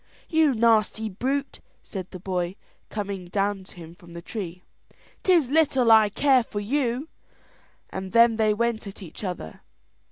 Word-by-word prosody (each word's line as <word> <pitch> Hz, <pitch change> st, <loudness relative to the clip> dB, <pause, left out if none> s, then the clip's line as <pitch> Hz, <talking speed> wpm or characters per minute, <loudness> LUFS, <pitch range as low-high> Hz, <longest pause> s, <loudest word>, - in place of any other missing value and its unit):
"You 315 Hz, -5 st, +3 dB
nasty 220 Hz, -1 st, +2 dB
brute," 270 Hz, +8 st, -2 dB, 0.2 s
said 185 Hz, -3 st, -7 dB
the -, -, -8 dB
cowboy, 180 Hz, 0 st, -2 dB, 0.3 s
coming 200 Hz, -3 st, -4 dB
down 195 Hz, +1 st, -1 dB
to -, -, -15 dB
him 165 Hz, -2 st, -11 dB
from 175 Hz, -2 st, -16 dB
the 170 Hz, -, -7 dB
tree, 180 Hz, -3 st, -6 dB, 0.6 s
"'tis 335 Hz, -9 st, +3 dB
little 270 Hz, -6 st, +3 dB
I 220 Hz, -1 st, +7 dB
care 265 Hz, +4 st, +4 dB
for 220 Hz, -2 st, -5 dB
you;" 250 Hz, +4 st, -1 dB, 0.8 s
and 190 Hz, 0 st, -5 dB
then 230 Hz, -1 st, +5 dB
they 215 Hz, -1 st, +3 dB
went 225 Hz, 0 st, -1 dB
at 195 Hz, 0 st, -9 dB
each 170 Hz, +4 st, -10 dB
other. 180 Hz, -, -6 dB
215 Hz, 155 wpm, -25 LUFS, 190-240 Hz, 0.8 s, I